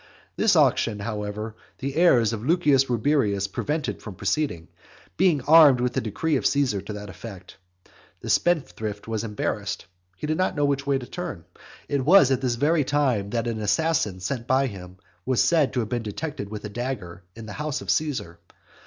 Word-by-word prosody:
This - - +3
auction, 110 -3 +3
however, 105 0 -4 0.2
the 135 0 -4
heirs 125 -10 +4
of 110 -1 -5
Lucius 145 -3 +3
Rubrius 115 -5 +1
prevented 150 +9 -3
from 105 -4 -8
proceeding, 95 - -2 0.5
being 170 -6 +3
armed 150 -4 +7
with 125 0 -1
a - - +1
decree 140 +8 -1
of - - -4
Caesar 135 -8 +1
to 100 +2 -7
that 105 0 -7
effect. 95 -4 -11 0.6
The - - -6
spendthrift 110 -12 0
was 110 -1 -2
embarrassed. 105 -2 -3 0.3
He - - -5
did 155 +1 -1
not 185 - 0
know 145 -1 +1
which 140 0 -1
way 140 -1 +2
to 130 - -7
turn. 165 - -6 0.4
It 140 -2 -1
was 155 -2 +6
at 130 -1 +1
this 125 -3 0
very 150 +5 +2
time 130 -8 0
that 115 +2 -1
an 115 -2 -2
assassin 110 - 0
sent 120 +4 -4
by 130 +1 +3
him 95 -6 -8 0.3
was 130 +2 0
said 160 -5 +3
to 125 - +1
have 110 - -4
been 120 -1 -1
detected 110 0 -5
with 105 0 -7
a - - -5
dagger 105 -6 -5
in 115 0 -9
the 105 - -8
house 150 +1 -3
of - - -2
Caesar. 130 - -2
125 Hz, 190 wpm, -25 LUFS, 105-145 Hz, 0.6 s, armed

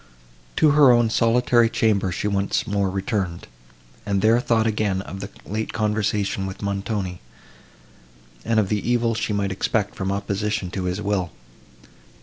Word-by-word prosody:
To 155 -2 +4
her 145 -2 +6
own 120 -2 +3
solitary 120 0 +3
chamber 100 -5 +1
she 90 - -2
once 100 +3 0
more 100 -3 0
returned, 95 -2 -3 0.6
and 100 -1 -1
there 115 +2 +5
thought 115 -2 +1
again 105 -3 0
of 95 - -8
the 100 - -6 0.2
late 110 +2 -4
conversation 105 -2 -1
with 95 +2 -8
Montoni, 100 -2 -3 1.2
and 115 -1 +2
of 100 -3 0
the 105 - +1
evil 120 -1 +2
she 110 - -2
might 100 -1 -1
expect 100 +2 -1
from 95 0 -3
opposition 100 -1 -2
to 95 -2 -3
his 90 +3 -2
will. 100 -4 -1
105 Hz, 150 wpm, -23 LUFS, 95-110 Hz, 1.2 s, her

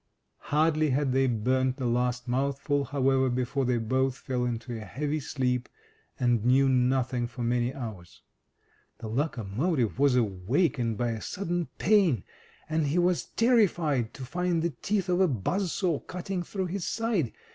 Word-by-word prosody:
Hardly 155 0 +3
had 135 0 +1
they 135 +1 +3
burned 130 +3 +1
the 130 -2 -4
last 125 +1 0
mouthful, 140 +2 0
however, 135 -1 +2
before 125 +2 -1
they 125 -1 +1
both 130 +3 0
fell 125 -2 -2
into 120 0 -3
a - - -5
heavy 145 +8 -2
sleep, 125 -3 -1 0.5
and 120 -3 +2
knew 130 +3 +4
nothing 125 -1 +1
for 120 0 -6
many 120 +1 +1
hours. 110 -10 -8 0.7
The 110 - -7
locomotive 120 - -1
was 140 -2 +4
awakened 115 - +1
by 120 0 0
a 110 -1 -4
sudden 175 -3 -2
pain, 185 - +3 0.4
and 160 -1 0
he 145 +5 0
was 175 0 +2
terrified 175 - +2
to 130 - -7
find 175 +3 -1
the 170 - 0
teeth 200 +4 -2
of 180 +1 +2
a 190 - +5
buzz 170 - -1
saw 175 -7 0
cutting 180 0 -4
through 190 +2 -3
his 180 0 -3
side. 220 - 0
135 Hz, 155 wpm, -28 LUFS, 120-165 Hz, 0.7 s, a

